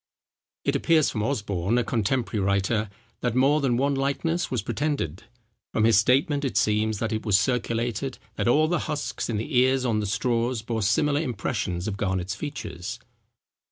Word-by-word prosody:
It -, -, 0 dB
appears 160 Hz, -3 st, +3 dB
from 105 Hz, -, -2 dB
Osborne, 105 Hz, -4 st, 0 dB
a 120 Hz, -, +2 dB
contemporary 115 Hz, -2 st, 0 dB
writer, 100 Hz, +2 st, +1 dB, 0.3 s
that 120 Hz, -2 st, -1 dB
more 140 Hz, +4 st, +4 dB
than 125 Hz, -4 st, +1 dB
one 140 Hz, +2 st, +2 dB
likeness 140 Hz, +6 st, -1 dB
was 125 Hz, -6 st, -1 dB
pretended. 135 Hz, -, -2 dB, 0.5 s
From 110 Hz, -, +2 dB
his 110 Hz, -2 st, +6 dB
statement 140 Hz, +6 st, +2 dB
it 135 Hz, -, -1 dB
seems, 105 Hz, 0 st, +2 dB
that 110 Hz, +2 st, -2 dB
it 110 Hz, -, -2 dB
was 105 Hz, -4 st, +4 dB
circulated, 120 Hz, +1 st, -1 dB, 0.2 s
that -, -, -1 dB
all 155 Hz, +6 st, +4 dB
the 175 Hz, 0 st, +1 dB
husks 150 Hz, -4 st, -3 dB
in 110 Hz, -, 0 dB
the 115 Hz, +7 st, -4 dB
ears 130 Hz, +1 st, +3 dB
on 115 Hz, -3 st, +1 dB
the 105 Hz, -, -2 dB
straws 115 Hz, +2 st, 0 dB
bore 115 Hz, -1 st, -2 dB
similar 145 Hz, +8 st, +2 dB
impressions 105 Hz, -, -2 dB
of 100 Hz, -2 st, -3 dB
Garnet's 95 Hz, -1 st, -1 dB
features. 105 Hz, -, -6 dB
115 Hz, 170 wpm, -25 LUFS, 105-135 Hz, 0.5 s, his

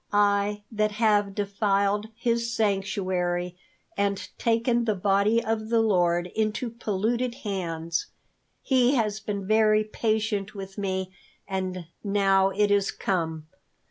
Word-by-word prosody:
I, 205 Hz, 0 st, +2 dB
that 215 Hz, -1 st, 0 dB
have 205 Hz, -2 st, +2 dB
defiled 200 Hz, 0 st, 0 dB
His 235 Hz, 0 st, 0 dB
sanctuary, 185 Hz, -4 st, -1 dB, 0.4 s
and 200 Hz, -1 st, -1 dB
taken 235 Hz, +1 st, +2 dB
the 215 Hz, -2 st, +1 dB
Body 200 Hz, +4 st, +2 dB
of 220 Hz, 0 st, -2 dB
the 230 Hz, -1 st, +3 dB
Lord 175 Hz, -5 st, +2 dB
into 220 Hz, +2 st, -1 dB
polluted 235 Hz, +2 st, -1 dB
hands, 165 Hz, -4 st, -2 dB, 0.6 s
He 260 Hz, 0 st, +3 dB
has 215 Hz, -4 st, 0 dB
been 205 Hz, -2 st, -4 dB
very 215 Hz, +1 st, +4 dB
patient 215 Hz, -1 st, -1 dB
with 195 Hz, -1 st, -7 dB
me, 190 Hz, -2 st, -2 dB, 0.4 s
and 185 Hz, -2 st, -3 dB, 0.2 s
now 195 Hz, -1 st, +3 dB
it 205 Hz, +1 st, +1 dB
is 200 Hz, -1 st, +3 dB
come. 160 Hz, -5 st, -2 dB
205 Hz, 120 wpm, -26 LUFS, 195-220 Hz, 0.6 s, very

